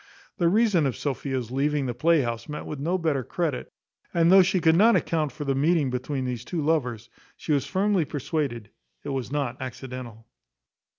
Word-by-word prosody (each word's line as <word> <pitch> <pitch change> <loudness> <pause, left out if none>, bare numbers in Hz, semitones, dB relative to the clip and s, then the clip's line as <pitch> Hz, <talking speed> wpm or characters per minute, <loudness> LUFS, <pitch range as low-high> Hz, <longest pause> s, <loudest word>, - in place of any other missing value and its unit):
The 170 -1 +4
reason 200 -6 +3
of 130 - -3
Sophia's 130 -4 -3
leaving 140 +1 0
the 125 - -2
playhouse 130 -3 +1
met 150 - -5
with 150 - -6
no 170 +6 0
better 155 -6 0
credit; 160 -1 -3 0.4
and 170 0 +4
though 190 0 +9
she 185 +1 +2
could 160 -1 +4
not 225 +6 +6
account 155 -3 0
for 145 - -7
the 135 - +1
meeting 145 0 +2
between 130 +1 -3
these 125 -2 -3
two 170 +6 -4
lovers, 125 -8 0 0.3
she - - -4
was 140 -2 +1
firmly 195 -3 +1
persuaded 140 -7 -3 0.3
it - - -5
was 135 -2 -3
not 135 -4 -2
accidental. 125 -3 -7
145 Hz, 180 wpm, -26 LUFS, 130-165 Hz, 0.4 s, though